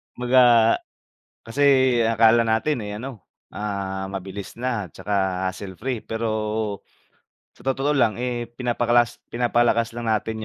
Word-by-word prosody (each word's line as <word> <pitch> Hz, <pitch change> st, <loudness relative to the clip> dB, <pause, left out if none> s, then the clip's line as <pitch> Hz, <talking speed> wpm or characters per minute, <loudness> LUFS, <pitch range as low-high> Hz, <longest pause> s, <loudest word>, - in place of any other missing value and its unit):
Kumbaga, 120 Hz, -2 st, +4 dB, 0.7 s
kasi 120 Hz, +6 st, -2 dB, 0.4 s
akala 115 Hz, +1 st, +4 dB
natin, 115 Hz, +4 st, 0 dB
eh, 105 Hz, 0 st, -5 dB
ano, 125 Hz, -4 st, -8 dB, 0.3 s
ah, 95 Hz, -2 st, -4 dB
mabilis 95 Hz, +2 st, -7 dB
na, 120 Hz, -7 st, -2 dB
'tsaka 95 Hz, -2 st, -1 dB
hassle 95 Hz, 0 st, -6 dB
free 125 Hz, -1 st, -3 dB
pero 110 Hz, -2 st, -2 dB, 0.7 s
sa -, -, -18 dB
totoo 135 Hz, +2 st, 0 dB
lang, 120 Hz, -3 st, +2 dB
eh, 120 Hz, -1 st, -2 dB
pinapakalas 120 Hz, -1 st, +1 dB, 0.2 s
pinapalakas 120 Hz, -1 st, +1 dB
lang 120 Hz, -, -4 dB
natin 110 Hz, 0 st, -2 dB
115 Hz, 120 wpm, -23 LUFS, 105-120 Hz, 0.7 s, Kumbaga